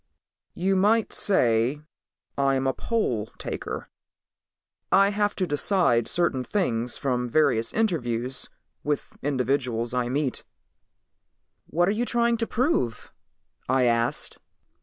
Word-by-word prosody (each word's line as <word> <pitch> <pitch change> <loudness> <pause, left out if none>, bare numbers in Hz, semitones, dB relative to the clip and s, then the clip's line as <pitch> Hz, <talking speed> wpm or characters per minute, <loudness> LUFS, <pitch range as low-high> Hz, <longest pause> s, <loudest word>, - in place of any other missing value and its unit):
"You 190 +2 +1
might 210 +4 +2
say 125 - +3 0.6
I'm 135 -1 +1
a 135 - +1
poll 125 - -1
taker. - - -5 1.0
I 195 +1 +5
have 205 0 0
to 185 - 0
decide 145 - +2
certain 170 -7 0
things 125 - 0
from 125 -2 -1
various 125 -5 +2
interviews 130 - -1 0.3
with 145 -1 -3
individuals 125 -4 -1
I 125 -1 0
meet." 140 0 -1 1.2
"What 175 +2 +1
are - - +3
you 225 +4 -1
trying 235 -1 +1
to 230 0 -2
prove?" 230 - -1 0.6
I 130 0 +3
asked. 115 -1 0
140 Hz, 115 wpm, -25 LUFS, 120-195 Hz, 1.2 s, I